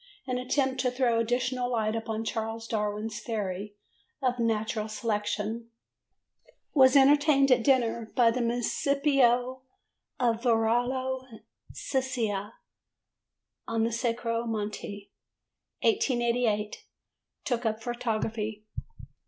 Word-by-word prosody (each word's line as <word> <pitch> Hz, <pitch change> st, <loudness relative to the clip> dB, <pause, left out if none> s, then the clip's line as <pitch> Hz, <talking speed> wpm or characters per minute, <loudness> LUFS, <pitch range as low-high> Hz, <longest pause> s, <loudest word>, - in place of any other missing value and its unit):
An 250 Hz, -2 st, -2 dB
attempt 265 Hz, +1 st, 0 dB
to 250 Hz, -, +2 dB
throw 245 Hz, -2 st, +1 dB
additional 245 Hz, +2 st, 0 dB
light 220 Hz, -1 st, 0 dB
upon 225 Hz, 0 st, -3 dB
Charles 225 Hz, 0 st, -3 dB
Darwin's 215 Hz, +1 st, -2 dB
theory 205 Hz, -3 st, -4 dB, 0.4 s
of 250 Hz, -3 st, 0 dB
Natural 220 Hz, -1 st, 0 dB
Selection. 215 Hz, +1 st, -2 dB, 1.0 s
Was 260 Hz, -2 st, +6 dB
entertained 280 Hz, 0 st, +5 dB
at 250 Hz, -2 st, +4 dB
dinner 235 Hz, -4 st, +2 dB
by 235 Hz, -2 st, +5 dB
the 250 Hz, +2 st, -1 dB
Municipio 255 Hz, +1 st, +2 dB, 0.6 s
of 235 Hz, -2 st, +1 dB
Varallo 245 Hz, +1 st, 0 dB, 0.3 s
Sesia 230 Hz, -6 st, -2 dB, 1.1 s
on 225 Hz, -1 st, 0 dB
the 230 Hz, -, +1 dB
Sacro 230 Hz, 0 st, -1 dB
Monte. 205 Hz, -2 st, -5 dB, 0.7 s
1888. 240 Hz, -, +1 dB, 0.6 s
Took 245 Hz, -3 st, 0 dB
up 220 Hz, 0 st, -2 dB
photography. 220 Hz, -3 st, -3 dB
235 Hz, 95 wpm, -28 LUFS, 220-255 Hz, 1.1 s, Was